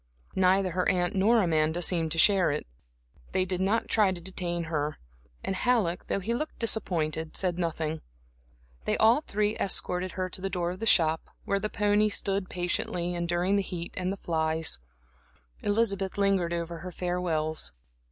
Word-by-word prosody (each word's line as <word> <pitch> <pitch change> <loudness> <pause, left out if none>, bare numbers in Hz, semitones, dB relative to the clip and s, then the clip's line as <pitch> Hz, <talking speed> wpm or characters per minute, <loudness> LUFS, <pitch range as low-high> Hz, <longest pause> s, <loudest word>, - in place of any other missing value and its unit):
Neither 190 0 +3
her 180 +2 +1
aunt 175 -1 +1
nor 215 +3 +4
Amanda 160 -1 +1
seemed 165 -2 +1
to - - -3
share 190 +1 +5
it. 145 +1 -2 0.7
They 185 - +2
did 185 0 -1
not 205 +4 +1
try 210 -4 +3
to 180 - -5
detain 175 -1 -3
her, 150 -2 -2 0.5
and 190 - -2
Halleck, 205 -6 +1
though - - 0
he 225 +5 -1
looked 305 +6 -3
disappointed, 160 -8 0
said 180 -2 0
nothing. 160 -2 -2 0.8
They - - +1
all 230 +6 +5
three 210 -5 -1
escorted 180 -1 0
her 185 -1 -2
to 185 - -4
the 195 - -2
door 175 -2 -1
of 185 - -8
the 225 - -2
shop, 160 -5 +3 0.2
where 200 - +1
the 205 - -4
white - - -18
pony 210 +1 +3
stood 195 -2 0
patiently 175 0 -1
enduring 175 +3 0
the - - +2
heat 175 -3 -6
and 185 0 -1
the 200 - -4
flies. 160 - 0 0.8
Elizabeth 200 -3 0
lingered 195 -4 +2
over 170 0 -3
her 180 - -7
farewells. 165 - -1
180 Hz, 170 wpm, -28 LUFS, 170-195 Hz, 0.8 s, share